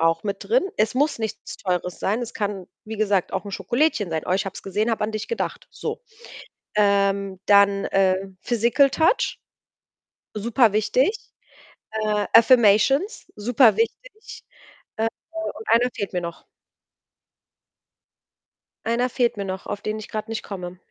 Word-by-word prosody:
auch 165 0 +2
mit 200 -1 -2
drin. 480 0 +3
Es 215 +2 +1
muss 290 +2 +1
nichts 220 -2 -5
Teures 180 -1 -2
sein. 215 +5 0
Es 240 0 -6
kann, 200 -3 -3 0.2
wie 220 +1 -6
gesagt, 200 -3 +1
auch - - -2
'n 200 - -7
Schokolädchen 235 - 0
sein. 160 -1 -2
„Oh, - - -3
ich 195 +2 0
habe 190 - -5
es - - -9
gesehen, 210 +4 -1
habe 220 - 0
an 215 - -3
dich 215 - -4
gedacht.“ 465 - -3
So. - - -5 0.8
Ähm, 200 -2 +2
dann, 200 -1 +5
äh, 195 0 +1
Physical 240 +4 +3
Touch, 325 - +1 0.9
superwichtig. 220 - +2 0.8
Äh, 215 -1 0
Affirmations, 245 - +5
superwichtig. 280 - +1 0.5
Äh, 225 +1 +1 0.2
und 325 -9 -6
einer 240 +2 +4
fehlt 200 - -4
mir 180 - 0
noch. 170 0 -7 2.4
Einer 245 +2 +1
fehlt 240 -1 +1
mir 200 -1 -4
noch, 190 0 -5
auf 205 - -5
den 215 0 -3
ich 215 - -9
grad 215 +1 -5
nicht 225 - -4
komme. 180 -2 -7
215 Hz, 145 wpm, -23 LUFS, 195-240 Hz, 2.4 s, dann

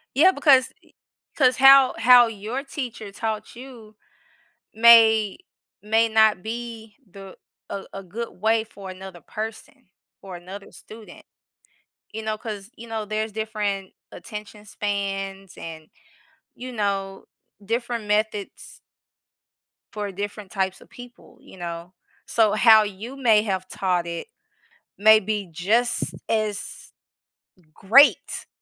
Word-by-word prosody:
Yeah, 340 +8 +6
because 280 -5 +4
y - - -27 0.4
'cause 255 -4 +3
how 270 0 +7
how 245 +1 +7
your 225 +5 -5
teacher 245 -7 -7
taught 215 +1 -5
you 235 -4 -13 0.8
may 225 -2 +6 0.4
may 225 +2 +2
not 220 -4 +3
be 225 -1 -7
the 195 0 -12 0.3
a 195 - -6
a 195 - -7
good 225 +6 -6
way 220 +1 +2
for 200 -3 -11
another 185 -1 -10
person 225 - -8 0.3
or 190 -2 -9
another 190 +3 -10
student, 220 0 -14 0.9
you 220 - -6
know, 215 0 -3
'cause, 210 -2 -7
you 235 +1 -11
know, 220 -1 -4
there's 215 +1 -3
different 210 -3 -4 0.2
attention 210 +2 -10
spans 195 -2 -4
and, 160 -1 -9 0.7
you 255 +1 -8
know, 195 -3 -3 0.4
different 235 +1 -3
methods 210 -1 -3 1.1
for 205 -2 -4
different 205 0 -7
types 190 -2 -2
of - - -18
people, 245 0 -15
you - - -16
know? 170 0 -7 0.3
So, 220 -3 +2
how 220 0 +6
you 210 +5 -7
may 225 -6 +3
have 190 -3 -3
taught 180 -3 -1
it, 170 -1 -6 0.7
may 215 +2 +6
be 210 -2 -4
just 215 +9 0 0.2
as 215 -2 -3 0.8
great 255 - +4
215 Hz, 120 wpm, -23 LUFS, 195-230 Hz, 1.1 s, how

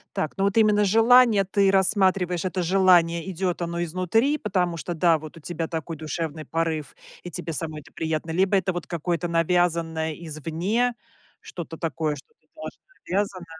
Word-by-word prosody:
Так, 155 - -2
ну 195 - 0
вот 200 +2 +1
именно 210 -2 +4
желание 225 0 +5
ты 195 0 +2
рассматриваешь, 190 -2 +2
это 185 0 -1
желание 175 -2 +3
идёт 180 -1 -2
оно 170 0 -2
изнутри, 185 - +1
потому 180 - -1
что, 175 +2 -4
да, 165 0 +3
вот 155 +1 -11
у - - -10
тебя 165 +1 -4
такой 160 0 -5
душевный 155 0 -4
порыв, 160 -3 -2 0.3
и 175 - -8
тебе 165 +1 -5
самой 155 0 -4
это 145 - -19
приятно, 160 0 -2
либо 185 +4 +2
это 185 -1 +1
вот 175 - -5
какое-то 170 +1 -2
навязанное 165 -2 +1
извне, 170 - -2 0.5
что-то 165 -2 -8
такое, 155 -1 -2
что-то 455 - -18
тоже - - -8 0.3
навязано. 190 -1 -2
175 Hz, 165 wpm, -24 LUFS, 160-195 Hz, 0.5 s, желание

